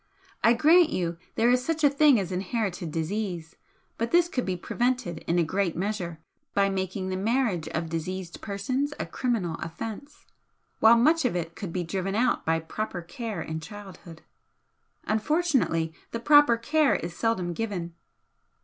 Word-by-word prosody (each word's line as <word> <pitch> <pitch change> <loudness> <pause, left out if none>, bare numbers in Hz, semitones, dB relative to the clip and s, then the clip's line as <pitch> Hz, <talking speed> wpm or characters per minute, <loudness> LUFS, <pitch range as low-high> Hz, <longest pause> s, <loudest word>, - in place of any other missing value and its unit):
I 230 - +6
grant 320 +7 +5
you 170 - -2 0.2
there 235 +2 +3
is 250 0 +2
such 315 +2 -2
a 290 - +7
thing 285 -4 +5
as 190 -2 -3
inherited 185 -3 -2
disease, 170 0 -3 0.4
but 230 +1 0
this 345 0 +4
could 250 - -2
be 185 -1 -1
prevented 240 -4 -1
in 170 - +1
a 175 - +4
great 180 +1 -1
measure 180 -3 -3 0.4
by 200 0 +3
making 190 0 -3
the 185 - -2
marriage 210 -4 0
of 160 +1 -3
diseased 170 +2 -5
persons 255 +9 -2
a - - -2
criminal 205 -10 -2
offence, 225 - -7 0.5
while 225 +1 +7
much 315 +7 +4
of 250 -7 0
it 170 -1 -3
could 195 -5 -6
be 180 +1 -2
driven 190 +3 -3
out 240 +2 +1
by 165 0 +2
proper 175 +2 -5
care 195 0 -5
in 160 0 -4
childhood. 180 -2 -11 0.8
Unfortunately, 220 - +1 0.2
the 230 - -4
proper 290 -2 +6
care 295 +5 +2
is 170 0 -4
seldom 185 -6 0
given." 180 -4 -4
200 Hz, 160 wpm, -27 LUFS, 175-245 Hz, 0.8 s, a